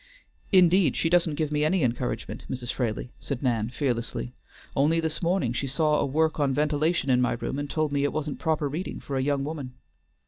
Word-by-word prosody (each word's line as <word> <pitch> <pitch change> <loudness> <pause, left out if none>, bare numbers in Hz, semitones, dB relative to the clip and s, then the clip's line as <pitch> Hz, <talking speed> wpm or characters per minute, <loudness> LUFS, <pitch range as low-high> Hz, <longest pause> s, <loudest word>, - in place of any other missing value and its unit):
"Indeed 185 -2 +5
she 165 - +1
doesn't 170 -3 +3
give 155 -1 -1
me 150 0 +1
any 165 +3 +2
encouragement, 115 - -2
Mrs. 125 -1 -3
Fraley," 120 0 -2
said 140 -2 -4
Nan, 115 -4 +1
fearlessly. 120 - -2 0.4
"Only 155 +4 +3
this 160 -1 -2
morning 170 -9 +1
she 130 +3 -2
saw 150 +3 +2
a - - +2
work 155 +3 +1
on 140 -2 +2
ventilation 150 0 +1
in 125 0 +4
my 125 0 +2
room 125 +4 -3
and 145 0 -4
told 155 -1 0
me 140 0 +1
it 145 - +1
wasn't 150 -1 -3
proper 155 -3 0
reading 160 +7 -4
for 140 - -5
a 130 - +1
young 140 0 0
woman." 140 -4 -5
145 Hz, 205 wpm, -26 LUFS, 130-160 Hz, 0.4 s, Indeed